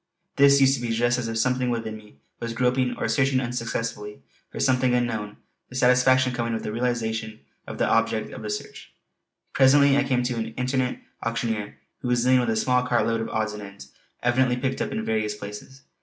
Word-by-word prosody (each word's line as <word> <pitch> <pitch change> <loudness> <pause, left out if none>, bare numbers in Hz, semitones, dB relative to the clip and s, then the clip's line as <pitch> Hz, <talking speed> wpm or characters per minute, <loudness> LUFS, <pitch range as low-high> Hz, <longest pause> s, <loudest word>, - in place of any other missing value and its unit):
This 140 0 +6
used 135 0 +5
to 130 - -2
be 120 - -3
just 120 +2 +1
as 120 - -3
if 115 0 -3
something 125 +2 +1
within 115 -2 -3
me 105 -9 -15 0.2
was 115 -1 -4
groping 125 +1 +1
or - - -1
searching 135 -2 +2
unsuccessfully 115 - -4 0.3
for - - -8
something 130 -1 +2
unknown, 110 -4 -2 0.3
the 125 - -11
satisfaction 130 0 +4
coming 115 -1 -2
with 110 - -3
the - - -3
realization 110 -2 -2 0.3
of - - -7
the - - +1
objective - - +1
of - - -8
the - - -5
search. - - -7 0.6
Presently 140 +1 +5
I 140 - +3
came 130 -2 0
to 120 -1 -2
an 115 0 -4
itinerant 125 0 -1 0.2
auctioneer 115 -3 -3 0.2
who - - -5
was 120 -1 +2
dealing 130 0 +4
with 120 -2 0
a 110 - +1
small 125 +3 +2
cart 125 -1 +1
load 115 0 0
of 115 - -4
odds 110 -1 -1
and 105 - -7
ends, 100 0 -11 0.3
evidently 125 0 +2
picked 130 +1 -2
up - - -2
in 220 0 -3
various 110 -1 -1
places. 105 +6 -10
120 Hz, 205 wpm, -25 LUFS, 110-130 Hz, 0.6 s, This